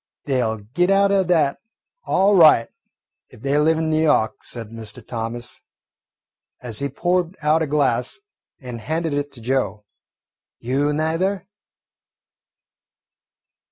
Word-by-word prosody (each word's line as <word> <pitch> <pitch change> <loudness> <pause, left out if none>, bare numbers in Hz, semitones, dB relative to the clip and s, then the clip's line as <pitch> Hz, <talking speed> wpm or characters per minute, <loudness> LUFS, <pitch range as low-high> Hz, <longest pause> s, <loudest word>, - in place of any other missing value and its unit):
"They 130 -3 +1
'll 110 -1 -1 0.2
git 175 +3 +2
out 195 0 +4
o' 200 -1 +4
that, 165 -6 +1 0.5
all 195 +2 +3
right, 155 -10 +6 0.6
if - - -17
they 140 +1 +1
live 160 +2 +3
in 160 -1 0
N' 155 - +2
Yawk," 150 -8 +1
said 115 -3 -7
Mr. 115 0 -8
Thomas, 120 +1 -6 1.0
as 120 -4 -4
he 140 0 -2
poured 180 +1 -1
out 155 +2 +3
a 160 - 0
glass 135 -4 0 0.4
and 125 -3 -8
handed 160 +5 -2
it 145 0 -2
to 120 - -11
Joe. 115 -4 -1 0.7
"You 135 +5 0
neither?" 165 +5 -1
145 Hz, 130 wpm, -21 LUFS, 120-165 Hz, 1.0 s, right